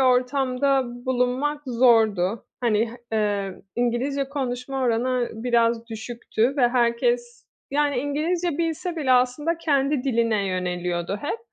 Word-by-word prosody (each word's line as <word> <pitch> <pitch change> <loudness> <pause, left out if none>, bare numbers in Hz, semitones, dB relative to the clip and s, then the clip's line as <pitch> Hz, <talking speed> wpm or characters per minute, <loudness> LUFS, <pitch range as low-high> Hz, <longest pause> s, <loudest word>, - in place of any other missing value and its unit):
ortamda 260 +1 +2 0.2
bulunmak 260 +4 0
zordu. 225 -5 +3
Hani, 225 -1 +1 0.2
h 220 - 0
emm, 200 -3 -1
İngilizce 245 +4 0
konuşma 265 -1 -3
oranı 245 +1 +1
biraz 230 0 +1
düşüktü 230 +3 -2
ve 245 -3 +4
herkes, 240 0 0 0.2
yani, 285 -1 +1
İngilizce 310 +4 -1
bilse 335 +1 -2
bile 275 -5 +2
aslında 255 +7 +2
kendi 280 -4 +1
diline 230 -5 +1
yöneliyordu 180 0 -2
hep. 300 +10 -2
250 Hz, 115 wpm, -24 LUFS, 230-275 Hz, 0.2 s, ve